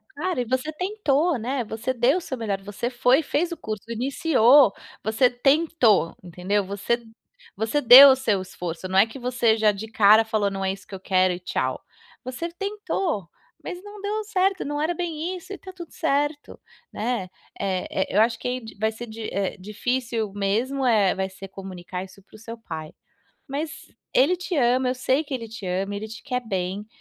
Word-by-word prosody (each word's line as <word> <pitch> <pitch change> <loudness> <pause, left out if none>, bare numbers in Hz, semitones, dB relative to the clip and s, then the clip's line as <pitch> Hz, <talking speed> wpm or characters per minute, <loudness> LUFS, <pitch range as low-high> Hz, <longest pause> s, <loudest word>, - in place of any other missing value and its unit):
Cara, 335 -2 -1
e 245 - -3
você 260 +6 -1
tentou, 350 - 0
né, 250 +3 -2
você 225 +4 -3
deu 250 +7 +3
o - - -3
seu 260 -5 -5
melhor, 200 -4 -2
você 205 +4 -4
foi, 250 +4 +3
fez 325 +4 -1
o 340 - -4
curso, 215 -2 -6
iniciou, 255 -1 +4 0.3
você 225 +4 +3
tentou, 250 - +2
entendeu? 185 +4 -1
Você 215 +5 -2 0.5
você 220 +7 0
deu 270 +1 +11
o 265 - +6
seu 215 -7 0
esforço, 180 -1 -6
não 190 - 0
é 205 - +7
que 245 - -10
você 245 -2 +2
já 215 -1 +3
de 210 +2 -7
cara 215 +1 +6
falou: 215 -2 0
"Não 195 0 -4
é 190 0 0
isso 195 - -13
que 195 - -8
eu - - -8
quero 185 -1 +2
e 175 - -6
tchau", 180 - -2 0.4
você 260 +7 -5
tentou, 380 - -3 0.3
mas 360 0 -6
não 410 0 -11
deu 425 +2 -2
certo, 385 -2 0
não 290 +1 -2
era 330 +3 0
bem 345 +1 -3
isso 375 +3 -10
e 395 - -6
tá 375 - -11
tudo 345 -3 -10
certo, 290 +1 -1 0.3
né. 225 -5 -2 0.3
Eh 190 -2 -2
eh 190 - 0
eu 210 - +3
acho 230 0 +2
que 250 +1 -2
di 220 - -11
vai 220 +1 +1
ser 235 +2 -8
di 220 +1 -9
eh, 195 0 -2
difícil 225 +2 -2
mesmo, 230 +7 -1
eh, 210 -6 +3
vai 190 0 -2
ser 195 +1 -10
comunicar 185 -1 -7
isso 190 +1 -14
para - - -19
o - - -11
seu 230 +1 -8
pai, 160 -8 -8 0.5
mas 305 +1 -6 0.2
ele 280 +8 +5
te 360 -1 -4
ama, 255 0 +3
eu 255 - 0
sei 260 +3 +1
que 285 - -5
ele 230 -3 -4
te 215 -3 -8
ama, 190 +3 -2
ele 215 +2 -5
te 220 +2 -10
quer 250 -3 -2
bem, 190 +1 -3
235 Hz, 200 wpm, -24 LUFS, 200-285 Hz, 0.5 s, deu